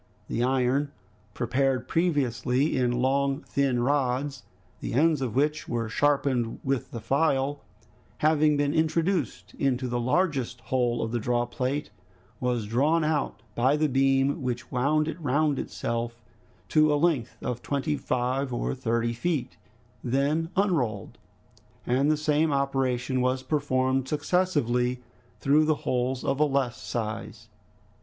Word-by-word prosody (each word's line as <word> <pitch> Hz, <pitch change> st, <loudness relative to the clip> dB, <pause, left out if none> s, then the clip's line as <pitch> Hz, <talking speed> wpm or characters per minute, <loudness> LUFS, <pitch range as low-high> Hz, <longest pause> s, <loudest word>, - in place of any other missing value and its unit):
The 120 Hz, -, -1 dB
iron, 130 Hz, +2 st, +1 dB, 0.5 s
prepared 130 Hz, +2 st, 0 dB
previously 140 Hz, -4 st, +1 dB
in 125 Hz, -2 st, +2 dB
long 135 Hz, +3 st, +1 dB
thin 130 Hz, -3 st, 0 dB
rods, 135 Hz, 0 st, 0 dB, 0.4 s
the -, -, -4 dB
ends 155 Hz, +1 st, +3 dB
of 125 Hz, -5 st, -2 dB
which 150 Hz, +3 st, 0 dB
were 115 Hz, -2 st, -2 dB
sharpened 135 Hz, -3 st, +1 dB
with 135 Hz, -2 st, -1 dB
the 115 Hz, -, -6 dB
file, 140 Hz, +3 st, +1 dB, 0.6 s
having 155 Hz, -1 st, +3 dB
been 145 Hz, 0 st, +1 dB
introduced 160 Hz, +1 st, 0 dB
into 130 Hz, -2 st, 0 dB
the 120 Hz, 0 st, -1 dB
largest 130 Hz, -2 st, 0 dB
hole 120 Hz, -2 st, 0 dB
of 110 Hz, -, -3 dB
the 120 Hz, -, 0 dB
drawplate, 125 Hz, +4 st, -1 dB, 0.5 s
was 125 Hz, -3 st, -1 dB
drawn 145 Hz, +9 st, +2 dB
out 150 Hz, -9 st, -1 dB
by 130 Hz, +6 st, +2 dB
the 155 Hz, 0 st, +2 dB
beam 135 Hz, +1 st, +2 dB
which 120 Hz, -2 st, -4 dB
wound 150 Hz, +5 st, +1 dB
it 160 Hz, +2 st, -5 dB
round 145 Hz, 0 st, +1 dB
itself, 115 Hz, 0 st, -3 dB, 0.5 s
to 155 Hz, -1 st, +4 dB
a -, -, +3 dB
length 145 Hz, -7 st, 0 dB
of 125 Hz, -1 st, -3 dB
twenty 145 Hz, +2 st, -1 dB
five 130 Hz, 0 st, -1 dB
or 120 Hz, -, -1 dB
thirty 115 Hz, -2 st, -1 dB
feet, 150 Hz, +2 st, -2 dB, 0.5 s
then 145 Hz, +6 st, 0 dB
unrolled, 145 Hz, -, 0 dB, 0.7 s
and 130 Hz, +4 st, +2 dB
the 155 Hz, -, +3 dB
same 150 Hz, +1 st, +2 dB
operation 130 Hz, -2 st, 0 dB
was 130 Hz, +1 st, 0 dB
performed 130 Hz, -2 st, 0 dB
successively 125 Hz, -7 st, 0 dB, 0.4 s
through 150 Hz, +3 st, +4 dB
the 155 Hz, 0 st, +2 dB
holes 125 Hz, +1 st, 0 dB
of 140 Hz, -, 0 dB
a -, -, +5 dB
less 135 Hz, -5 st, 0 dB
size. 110 Hz, -1 st, -5 dB
135 Hz, 135 wpm, -27 LUFS, 125-150 Hz, 0.7 s, a